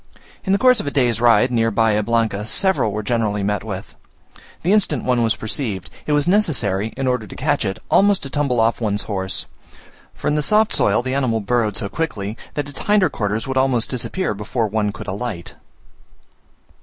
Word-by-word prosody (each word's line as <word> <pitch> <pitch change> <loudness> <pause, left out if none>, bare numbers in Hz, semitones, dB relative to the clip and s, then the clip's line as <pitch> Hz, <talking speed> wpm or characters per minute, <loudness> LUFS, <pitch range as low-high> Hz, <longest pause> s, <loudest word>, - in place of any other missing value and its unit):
In 190 - -1
the 195 - +4
course 255 +2 +5
of - - -4
a - - +2
day's 120 -5 +1
ride, 120 +1 +4
near 115 -1 +2
Bahia 110 -1 +2
Blanca, 115 -2 0
several 190 - +1
were 105 +1 -3
generally 105 -3 0
met 105 +1 -1
with. 100 -4 -6 0.7
The 180 +5 +3
instant 170 - +2
one 125 -1 +1
was 115 -2 +2
perceived, 110 -4 -2 0.2
it - - 0
was 145 +2 +2
necessary, 130 - +1
in 135 - -2
order 125 -4 -1
to - - -10
catch - - 0
it, 95 - -2
almost 200 0 +4
to 135 - -5
tumble 140 -5 0
off 115 +2 +2
one's 105 -2 -1
horse; 95 -2 -2 0.7
for - - -5
in 150 0 +2
soft 215 +8 +3
soil 105 +4 +2
the 130 +1 -2
animal 130 -5 +1
burrowed 110 0 0
so 110 -3 -2
quickly, 105 -7 -3 0.2
that 145 -1 -2
its 145 -1 -6
hinder 205 -7 +3
quarters 105 -2 -2
would 135 -1 -3
almost 130 -3 +1
disappear 150 - -2
before 105 +3 -2
one 105 0 -1
could - - -9
alight. 100 -2 -5
115 Hz, 195 wpm, -20 LUFS, 105-145 Hz, 0.7 s, course